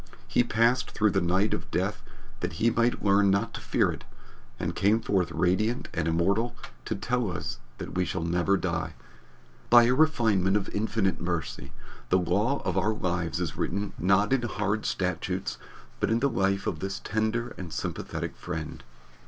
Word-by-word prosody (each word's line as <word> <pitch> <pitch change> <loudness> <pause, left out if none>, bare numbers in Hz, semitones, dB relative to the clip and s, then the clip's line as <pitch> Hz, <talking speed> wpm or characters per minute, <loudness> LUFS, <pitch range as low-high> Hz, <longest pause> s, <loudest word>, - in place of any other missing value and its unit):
He - - +3
passed 120 +2 +2
through 110 -1 +2
the 95 - +1
night 95 +5 +2
of - - -4
death - - -1 0.4
that - - -3
he 115 +1 +2
might 115 +1 +1
learn 100 0 +5
not 100 +1 +1
to - - -6
fear - - +2
it, - - -8 0.6
and - - -2
came 105 +3 +3
forth 95 -6 0
radiant 110 +7 +1
and 80 -1 -1
immortal 100 +9 +1 0.3
to 110 - -2
tell 125 0 -1
us 85 - -4 0.2
that - - -7
we 90 - +1
shall 80 - -2
never 90 +3 +2
die. 85 -3 -2 0.7
By 120 0 +8
a 120 +2 +4
refinement 110 - +3
of 100 - -3
infinite 105 -2 0
mercy, 80 -6 -3 0.4
the 95 - +4
law 100 +10 +1
of 95 0 +1
our 105 +3 +1
lives 85 -4 -1
is 85 -4 -2
written 100 +2 -2
not 100 +6 +3
in 135 - +3
hard 105 -2 -1
statutes 90 +1 -2 0.4
but - - +1
in 115 - +3
the 140 +3 +2
life 95 -3 +1
of 80 - -2
this 95 +2 -3
tender 110 +2 -1
and 90 -3 -7
sympathetic - - -4
friend. 80 -3 -6
100 Hz, 175 wpm, -28 LUFS, 90-110 Hz, 0.7 s, By